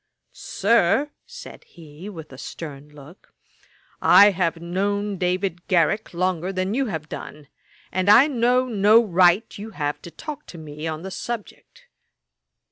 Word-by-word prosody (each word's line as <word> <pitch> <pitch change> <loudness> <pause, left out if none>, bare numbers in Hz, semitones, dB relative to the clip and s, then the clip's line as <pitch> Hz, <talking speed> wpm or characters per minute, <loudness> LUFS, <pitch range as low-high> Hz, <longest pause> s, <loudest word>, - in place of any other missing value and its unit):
'Sir, 230 +7 +1 0.2
(said 485 0 -11
he, 165 +3 -12
with 160 -7 -10
a - - -11
stern 145 -2 -9
look,) 150 +4 -16 0.7
I 205 +1 +7
have 170 -3 -1
known 200 +3 -2
David 180 -1 -2
Garrick 185 +3 +1
longer 180 0 -1
than 185 +1 -2
you 270 +2 0
have 160 -7 -5
done: 150 -1 -9 0.4
and 185 +1 0
I 235 +6 +8
know 250 -2 +1
no 220 -1 +4
right 180 +2 +3
you 215 +2 -7
have 145 -2 -3
to - - -10
talk 300 - -9
to 175 - -11
me 155 0 -7
on 160 +1 -5
the 190 - -7
subject.' 235 - -8
185 Hz, 145 wpm, -23 LUFS, 165-210 Hz, 0.7 s, I